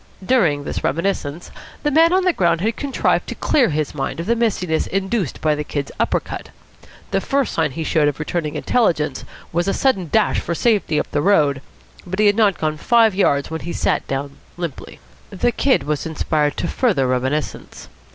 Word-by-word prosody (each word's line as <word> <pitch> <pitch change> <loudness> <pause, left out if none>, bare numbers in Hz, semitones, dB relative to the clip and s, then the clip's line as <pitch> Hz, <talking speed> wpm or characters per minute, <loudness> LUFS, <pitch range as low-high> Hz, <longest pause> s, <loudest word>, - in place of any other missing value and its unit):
During 170 - +2
this - - -4
reminiscence, 170 -1 -2 0.3
the 295 - +1
man 325 +3 +5
on 375 +1 +3
the 365 -1 +3
ground 170 - +1
had 220 +3 0
contrived 280 -2 0
to - - -5
clear 260 -8 +2
his 150 -2 -2
mind 140 +2 -3
of 165 - -3
the 235 - +2
mistiness 185 -8 0
induced 195 - -2
by 155 -1 +2
the 150 0 -3
Kid's 145 -1 -4
upper - - +2
cut. - - -8 0.6
The - - +1
first 275 -2 0
sign 160 -2 +1
he 160 - -3
showed 155 -1 +2
of 145 - -1
returning 155 0 -3
intelligence 165 - 0 0.3
was 175 +2 0
a 195 - +1
sudden 195 - +1
dash 220 -1 +2
for 170 - -3
safety 205 -7 +1
up - - -4
the 145 - 0
road. 150 -7 +3 0.5
But 185 +2 -4
he 215 - +3
had 205 0 +5
not 210 -4 +3
gone 155 -1 -1
five 225 +4 +4
yards 145 -7 +1
when 160 - -4
he 170 - -5
sat - - 0
down 140 +1 -4 0.2
limply. 170 -6 -6 0.3
The 220 +5 0
Kid 270 +2 +2
was 150 +1 -2
inspired 150 -2 0
to - - -1
further 200 - +1
reminiscence. 130 +4 -2
170 Hz, 195 wpm, -20 LUFS, 150-220 Hz, 0.6 s, man